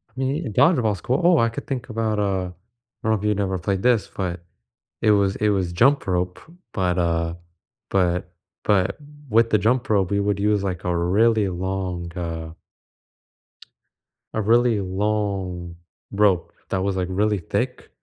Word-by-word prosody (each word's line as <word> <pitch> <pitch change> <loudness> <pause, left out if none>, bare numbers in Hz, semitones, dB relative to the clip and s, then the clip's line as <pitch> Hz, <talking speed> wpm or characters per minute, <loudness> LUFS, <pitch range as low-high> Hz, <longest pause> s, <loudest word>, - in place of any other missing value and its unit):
Me 135 +5 -1
uh, - - -3
dodgeball's 115 - +3
cool 130 - 0
Oh, 175 0 +5
I 115 - +3
could 115 - -7
think 130 -3 -4
about, 110 -1 -1
uh 95 -3 0 0.6
I - - -2
don't - - +4
know - - +4
if 105 -2 -2
you'd 105 -1 +1
never 95 -2 0
played 95 +2 -1
this, 120 -4 +3
but, 90 -2 -4 0.6
it 110 - +4
was 100 -2 +2
it 105 - +2
was 95 -4 0
jump 135 +11 +3
rope, 90 0 -1 0.3
but, 90 -2 0
uh, 85 -1 0 0.5
but 90 -1 0 0.3
but 100 -1 +2 0.3
with 115 +1 +4
the 110 - +4
jump 120 +5 +1
rope, 100 -3 +2
we 100 - +2
would 100 -1 0
use, 105 0 +2
like, 95 -3 -3
a 90 -1 0
really 105 +5 +3
long, 90 -1 -3
uh 80 -2 -4 1.8
a 110 - 0
really 115 0 +3
long 95 -3 -2 0.4
rope 100 -4 +2 0.2
that 95 - 0
was, 100 -1 0
like, 90 -1 -1
really 105 +2 +1
thick, 85 - -3
100 Hz, 165 wpm, -23 LUFS, 90-110 Hz, 1.8 s, Oh